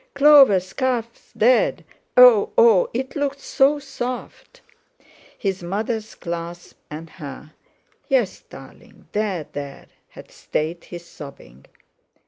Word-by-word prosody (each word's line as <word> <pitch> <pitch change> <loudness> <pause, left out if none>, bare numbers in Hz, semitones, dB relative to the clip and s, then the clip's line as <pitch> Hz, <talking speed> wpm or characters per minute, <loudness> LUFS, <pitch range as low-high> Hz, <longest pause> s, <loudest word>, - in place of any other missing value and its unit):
"Clover's 275 -11 +6
calf's 245 -3 -3
dead! 245 +3 +2 0.3
Oh! 250 -4 +7
Oh! 225 -6 +5
It 260 +3 -4
looked 285 -1 -2
so 275 +1 +2
soft!" 275 - -7 0.8
His 195 -2 -3
mother's 215 +5 -4
clasp, 170 0 -7
and 155 +2 -8
her: 155 -2 -11 0.5
"Yes, 250 -9 0
darling, - - -15
there, 200 -7 -2
there!" 140 -1 -7 0.2
had - - -14
stayed 160 +3 -4
his 175 -1 -10
sobbing. 100 - -13
210 Hz, 110 wpm, -21 LUFS, 170-255 Hz, 0.8 s, Oh